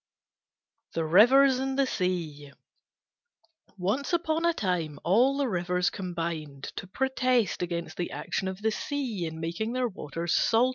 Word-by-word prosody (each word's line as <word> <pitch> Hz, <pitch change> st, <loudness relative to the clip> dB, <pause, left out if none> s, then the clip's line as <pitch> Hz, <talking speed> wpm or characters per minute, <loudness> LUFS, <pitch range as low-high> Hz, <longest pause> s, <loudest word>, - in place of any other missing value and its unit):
THE 165 Hz, -1 st, 0 dB
RIVERS 255 Hz, -, +6 dB
AND 265 Hz, 0 st, -2 dB
THE 275 Hz, -, +4 dB
SEA 165 Hz, -, -3 dB, 1.2 s
Once 210 Hz, -, -1 dB
upon 330 Hz, -1 st, +1 dB
a 340 Hz, -, +5 dB
time 170 Hz, -7 st, -1 dB
all 245 Hz, +10 st, +4 dB
the 280 Hz, -2 st, +1 dB
Rivers 180 Hz, -3 st, 0 dB
combined 165 Hz, -6 st, -4 dB
to -, -, -5 dB
protest 255 Hz, -1 st, +1 dB
against 170 Hz, -1 st, -4 dB
the 175 Hz, -, -2 dB
action 190 Hz, -, -3 dB
of 190 Hz, +2 st, -6 dB
the 220 Hz, -, +2 dB
Sea 235 Hz, -, -3 dB
in 160 Hz, 0 st, -7 dB
making 175 Hz, +8 st, -3 dB
their 255 Hz, -1 st, +1 dB
waters 170 Hz, -4 st, -4 dB
salt. 235 Hz, +3 st, +3 dB
190 Hz, 145 wpm, -28 LUFS, 170-255 Hz, 1.2 s, RIVERS